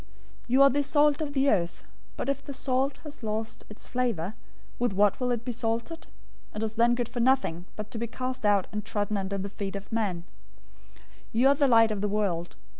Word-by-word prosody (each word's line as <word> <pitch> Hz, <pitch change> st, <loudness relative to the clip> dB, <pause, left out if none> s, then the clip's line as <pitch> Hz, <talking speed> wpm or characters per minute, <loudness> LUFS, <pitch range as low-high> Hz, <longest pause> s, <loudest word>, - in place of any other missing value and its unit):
005:013 -, -, -26 dB, 0.4 s
"You 255 Hz, +3 st, +4 dB
are 275 Hz, -, +8 dB
the 290 Hz, +3 st, +2 dB
salt 290 Hz, +1 st, +3 dB
of 290 Hz, -2 st, -3 dB
the 275 Hz, 0 st, +2 dB
earth, 175 Hz, -4 st, 0 dB, 0.3 s
but -, -, -3 dB
if 275 Hz, 0 st, -1 dB
the 280 Hz, -, -7 dB
salt 265 Hz, +1 st, 0 dB
has 295 Hz, -3 st, -9 dB
lost 220 Hz, 0 st, -4 dB
its 210 Hz, -, -10 dB
flavor, 230 Hz, -8 st, -1 dB, 0.5 s
with 245 Hz, -4 st, +1 dB
what 205 Hz, 0 st, +3 dB
will 250 Hz, -1 st, 0 dB
it 235 Hz, -1 st, -1 dB
be 250 Hz, -, -1 dB
salted? 235 Hz, +7 st, -3 dB, 0.5 s
It 210 Hz, -, -2 dB
is 220 Hz, 0 st, -2 dB
then 235 Hz, +1 st, +3 dB
good 240 Hz, -1 st, -1 dB
for 240 Hz, +1 st, -6 dB
nothing, 235 Hz, -9 st, +2 dB
but 210 Hz, 0 st, -6 dB
to 225 Hz, -, -5 dB
be 235 Hz, -, -2 dB
cast 255 Hz, +1 st, -4 dB
out 205 Hz, -2 st, +4 dB
and 210 Hz, 0 st, -3 dB
trodden 205 Hz, +1 st, -1 dB
under 195 Hz, 0 st, -2 dB
the 195 Hz, +1 st, -3 dB
feet 200 Hz, 0 st, -5 dB
of 200 Hz, 0 st, -7 dB
men. 200 Hz, -7 st, -1 dB, 0.7 s
005:014 -, -, -23 dB, 0.3 s
You 240 Hz, +4 st, +4 dB
are -, -, +6 dB
the 280 Hz, 0 st, +3 dB
light 225 Hz, -3 st, +6 dB
of 205 Hz, -2 st, -2 dB
the 210 Hz, -, 0 dB
world. 190 Hz, -5 st, -1 dB
230 Hz, 225 wpm, -28 LUFS, 205-255 Hz, 0.7 s, are